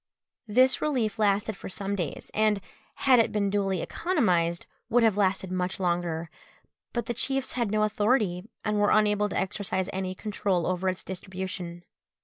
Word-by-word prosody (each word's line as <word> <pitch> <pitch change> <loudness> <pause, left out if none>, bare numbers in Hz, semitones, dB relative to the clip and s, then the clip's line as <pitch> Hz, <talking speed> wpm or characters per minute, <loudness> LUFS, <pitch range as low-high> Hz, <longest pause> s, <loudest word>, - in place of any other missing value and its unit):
_ 205 - -6
This 260 +1 +5
relief 235 -8 0
lasted 205 0 +2
for - - -8
some 195 +1 -2
days, 175 -7 -4
and, 215 -1 +3 0.4
had 260 -3 +5
it 230 - +3
been 200 -2 0
duly 195 -3 0
economised, 180 - +1 0.2
would 240 0 +4
have 220 -3 +4
lasted 190 -2 +1
much 185 +1 -2
longer; 170 -2 -1 0.6
but 235 - -2
the 240 - -2
chiefs 270 +3 -1
had 235 -4 -1
no 215 +1 +2
authority, 210 -3 +1 0.2
and 210 -1 +1
were 205 - +4
unable 210 -1 +3
to - - -3
exercise 190 0 -1
any 185 0 -3
control 195 -4 -1
over 185 +1 0
its 185 - -4
distribution. 185 -2 -6
200 Hz, 165 wpm, -27 LUFS, 185-215 Hz, 0.6 s, This